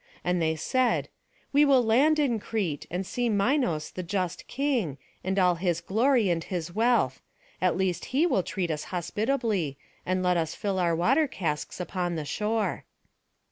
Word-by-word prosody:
And 180 -1 +1
they 160 0 +1
said, 250 - +1 0.4
"We 290 +1 +6
will 270 -4 +5
land 270 +8 +4
in 265 -7 +1
Crete, 195 -10 -3
and 180 +2 -3
see 245 +5 -1
Minos 205 - +1
the 185 - -5
just 180 -1 -3
king, 245 - -1 0.3
and 190 +1 -1
all 180 -2 +4
his 175 -1 -1
glory 220 +3 +2
and 165 -1 -1
his 175 -2 -4
wealth; 220 - +2 0.4
at 180 -2 +2
least 190 -2 -1
he 285 +6 +2
will 265 - +2
treat 175 -1 -2
us 150 -1 -3
hospitably, 205 - -1 0.3
and 185 0 -1
let 180 -1 +3
us 160 -1 -1
fill 195 -2 -2
our 170 -2 +2
water 265 - +3
casks 160 - -3
upon 180 -1 -2
the 155 -2 -3
shore." 215 +6 -1
190 Hz, 170 wpm, -27 LUFS, 170-235 Hz, 0.4 s, We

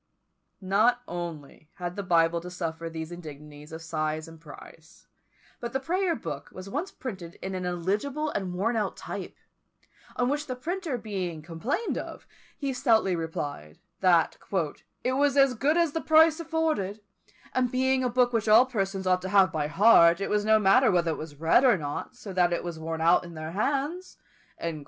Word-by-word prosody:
Not 220 +6 +2
only 160 -3 -7
had 175 -2 -5
the 200 - -3
Bible 170 -2 +2
to 180 - -8
suffer 165 -2 -4
these 160 0 -6
indignities 150 -3 -10
of 160 0 -8
size 155 -1 -2
and 165 -1 -13
price, 160 +1 -14 0.5
but 235 -1 -5
the 265 - 0
Prayer 345 +5 0
book 145 -10 -6
was 185 +1 -9
once 300 - -3
printed 185 -9 -7
in 190 - -5
an 185 -1 -3
illegible 210 - -1
and 190 -3 -3
worn 225 +6 0
out 210 -3 -1
type; - - -7 0.8
on 245 - +1
which 290 +2 -1
the 255 - -3
printer 325 +1 -3
being 185 -8 -4
complained 190 - -2
of, - - -8 0.3
he 275 -2 -2
stoutly 225 -7 +2
replied, 145 - -5 0.2
that 175 -4 +3 0.6
"it 255 - +1
was 285 +1 +2
as 275 -2 +5
good 285 +8 +1
as 335 -3 +3
the 325 - -2
price 315 +1 +5
afforded; 315 - -1 0.5
and 250 -1 +1
being 260 0 +2
a 250 - +1
book 245 0 +2
which 225 -1 0
all 225 +4 +8
persons 195 -6 -2
ought 185 0 +2
to 185 - -5
have 190 -3 +5
by 150 -2 -1
heart, 170 0 +6
it 195 - -3
was 210 0 +2
no 220 +1 +5
matter 215 +6 +5
whether 175 -4 +2
it 155 - -3
was 155 -1 -8
read 165 +10 +4
or 245 -7 +5
not, 145 - -5
so 215 -5 -9
that 180 -1 +3
it 175 - -1
was 170 -2 -5
worn 160 0 -4
out 170 +2 +4
in 170 -1 -10
their 155 0 -6
hands." 285 - -2
195 Hz, 185 wpm, -27 LUFS, 165-255 Hz, 0.8 s, all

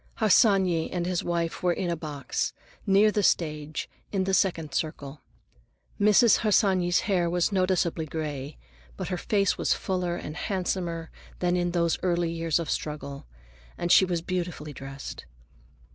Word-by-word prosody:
Harsanyi 190 -5 +3
and 175 -1 -2
his 180 -1 -1
wife 170 -1 -2
were 180 - +2
in 175 0 -1
a - - 0
box, 150 -5 -3 0.3
near 200 +2 +5
the 210 - +1
stage, 155 -4 0 0.2
in 195 -2 0
the 190 +1 -1
second 165 -6 +1
circle. 150 -2 -4 0.8
Mrs. 210 +2 +6
Harsanyi's 190 -4 +3
hair 180 -4 +1
was 175 +3 +1
noticeably 185 -4 +1
gray, 145 -2 -5 0.4
but - - -4
her 180 - -1
face 200 -1 +1
was - - +2
fuller 180 -2 -2
and 155 -3 -6
handsomer 175 -4 -2 0.3
than 180 0 +1
in 175 0 +1
those 170 -1 +1
early 175 -2 +1
years 165 -2 0
of 165 -2 -3
struggle, 145 -2 -4 0.5
and 175 - -1
she - - +8
was 175 -3 -1
beautifully 170 -5 -4
dressed. 135 +1 -8
175 Hz, 150 wpm, -27 LUFS, 160-185 Hz, 0.8 s, she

